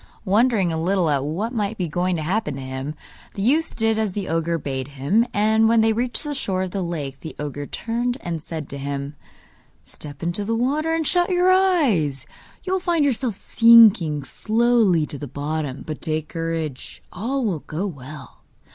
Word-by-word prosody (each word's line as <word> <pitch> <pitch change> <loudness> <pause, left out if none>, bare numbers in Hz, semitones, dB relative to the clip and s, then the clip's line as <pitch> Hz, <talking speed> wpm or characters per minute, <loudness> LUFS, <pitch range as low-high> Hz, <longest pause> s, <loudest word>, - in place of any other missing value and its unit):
Wondering 205 -3 +3
a 160 - -2
little 180 -2 +1
at 140 -2 +1
what 190 - -3
might 215 -1 -2
be 180 - -1
going 180 +3 0
to 160 - -3
happen 185 -2 -1
to - - -6
him, 130 +3 -5 0.4
the 195 - -3
youth 305 +8 +1
did 225 -1 +1
as 215 -4 -1
the 195 -1 -4
ogre 165 +1 0
bade 135 -3 -4
him, 145 - +1
and 220 +1 +3
when 230 -1 +4
they 220 0 +3
reached 240 +5 -2
the 295 -1 -3
shore 190 -8 -1
of 185 - -4
the 195 - -2
lake, 150 -6 -4
the 160 - -8
ogre 145 -1 -5
turned 240 +2 -2
and 165 -2 -4
said 160 -2 -6
to 140 - -6
him: 140 +1 -4 0.7
'Step 145 -1 -9
into 175 +4 -1
the 225 +3 -1
water 290 +7 0
and 325 -1 0
shut 350 +4 +2
your 365 0 +3
eyes! 280 - +2 0.4
You 375 - -2
will 380 - +2
find 345 -4 +1
yourself 250 -5 0
sinking 215 -11 +5
slowly 220 - +2
to 145 - -8
the 145 - -6
bottom; 145 0 -4
but 155 -2 -6
take 155 -2 -2
courage, 165 -5 -4
all 250 +7 -2
will 185 -7 -1
go 160 +7 -4
well. 145 -5 -9
185 Hz, 190 wpm, -22 LUFS, 150-230 Hz, 0.7 s, sinking